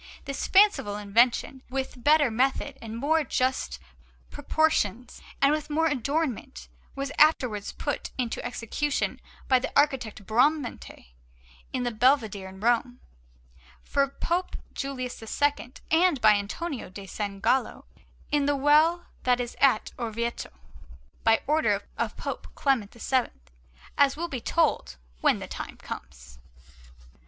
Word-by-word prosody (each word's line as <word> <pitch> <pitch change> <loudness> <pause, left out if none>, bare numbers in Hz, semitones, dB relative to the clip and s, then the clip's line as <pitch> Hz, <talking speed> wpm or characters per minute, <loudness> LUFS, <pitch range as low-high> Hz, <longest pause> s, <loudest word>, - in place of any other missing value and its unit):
This 275 0 -3
fanciful 385 - +4
invention, 230 +5 +2
with 260 -2 -4
better 295 -3 +5
method 265 +4 0
and 225 0 -6
more 310 +5 +2
just 260 -1 -1 0.5
proportions, 270 -6 0 0.2
and 280 - +6
with 305 0 -2
more 315 +2 +1
adornment, 275 - -2 0.3
was 275 0 -3
afterwards 250 -9 +3
put - - -4
into 245 -3 -2
execution 260 +5 -2 0.3
by 260 -1 +5
the 250 - -4
architect 250 -8 0
Bramante 250 - 0 0.6
in 255 -2 -2
the 245 - -1
Belvedere 220 -5 +2
in 190 0 -12
Rome, 240 +2 +1 0.8
for 280 -1 +1
Pope 345 +6 -2 0.2
Julius 255 -3 -5
II, 265 +2 -1 0.2
and 330 -2 +4
by 215 -2 +6
Antonio 215 - -2
da 195 +2 -9
San 200 0 -5
Gallo 260 +6 0 0.5
in 290 -1 +2
the 290 - +2
well 305 +5 +4 0.2
that 250 -1 +2
is 240 -1 -4
at 265 -6 +3
Orvieto, 235 0 -3 0.7
by 225 0 +4
order 310 +2 +2 0.2
of - - -3
Pope - - -5
Clement 255 -8 +1
VII, 260 +1 +1 0.7
as 280 0 +4
will 340 +2 -2
be 260 -7 -5
told 330 +3 0 0.2
when - - +3
the - - -7
time - - -7
comes. - - -10
260 Hz, 130 wpm, -27 LUFS, 225-290 Hz, 0.8 s, and